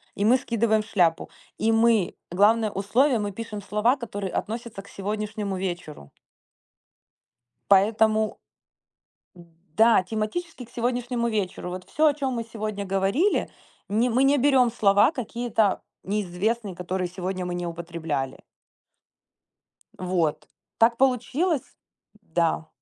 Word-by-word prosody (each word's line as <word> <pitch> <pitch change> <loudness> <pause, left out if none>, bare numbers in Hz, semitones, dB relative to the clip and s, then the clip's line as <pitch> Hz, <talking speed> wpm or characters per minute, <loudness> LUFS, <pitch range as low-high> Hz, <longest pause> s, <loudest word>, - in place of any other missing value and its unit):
И 200 - 0
мы 240 +4 +6
скидываем 230 -3 +1
в 215 - -11
шляпу. 175 -7 +1 0.3
И 225 - +2
мы, 225 -4 +3 0.2
главное 215 +4 +3
условие, 235 +7 +2
мы 205 -1 -2
пишем 215 0 -6
слова, 210 +6 +1
которые 205 -6 -5
относятся 225 -2 -4
к 200 - -18
сегодняшнему 210 0 -3
вечеру. 175 - -5 1.6
Поэтому, 215 +2 +3 1.0
д 175 - -14 0.3
да, 225 -3 +6
тематически 225 - -4
к 235 - -19
сегодняшнему 240 0 -1
вечеру 195 -4 -3
вот 180 0 -7
всё, 310 0 +2
о 295 - +4
чём 270 -3 -2
мы 230 -1 -3
сегодня 215 -2 -5
говорили, 195 - +1 0.4
не 230 +4 +1
мы 255 +4 +3
не 280 +1 +4
берём 260 -2 +4
слова 205 +1 +4
какие-то 235 - -1 0.2
неизвестные, 205 +2 -2
которые 180 +1 -3
сегодня 185 +1 -4
мы 180 - -3
не 175 0 -3
употребляли. 165 -5 -4 1.6
Вот, 180 -4 -1 0.3
так 230 +1 +4
получилось 270 +5 0 0.5
Да. 165 -3 0
215 Hz, 125 wpm, -25 LUFS, 185-235 Hz, 1.6 s, мы